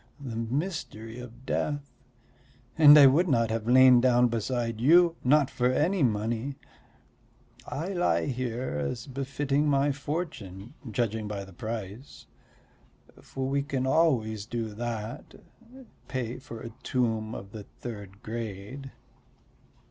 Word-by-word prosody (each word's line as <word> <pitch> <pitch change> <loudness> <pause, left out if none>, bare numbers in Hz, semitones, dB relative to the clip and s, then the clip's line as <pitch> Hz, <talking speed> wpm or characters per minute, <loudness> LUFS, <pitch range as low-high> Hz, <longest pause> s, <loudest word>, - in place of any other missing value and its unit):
The 130 -5 -6
mystery 115 - -4
of 125 +1 -11
death! 145 0 -2 0.9
And 150 -2 +9
I 145 - +9
would 150 +7 +5
not 115 -6 +2
have 115 0 -3
lain 130 0 +7
down 125 -1 +4
beside 115 0 -2
you 170 +5 +5
not 140 +1 +3
for 125 0 +1
any 170 +8 +1
money; 115 +3 0 1.1
I 165 +6 -4
lie 180 -2 +1
here 125 - -3
as 75 - -3
befitting 140 +2 -1
my 140 0 +3
fortune, 135 - -5 0.2
judging 110 -1 -1
by 100 -2 -5
the 95 - -14
price. 110 +5 -7 1.0
For 135 -1 -5
we 140 +1 +1
can 135 -2 -2
always 115 -9 +1
do 115 -2 -3
that 115 0 -5 0.7
pay 125 -2 -4
for 115 -4 -9
a 115 - -8
tomb 115 -3 -1
of 100 0 -9
the 110 - -7 0.2
third 105 -3 -8
grade." 115 +4 -6
125 Hz, 125 wpm, -28 LUFS, 110-140 Hz, 1.1 s, And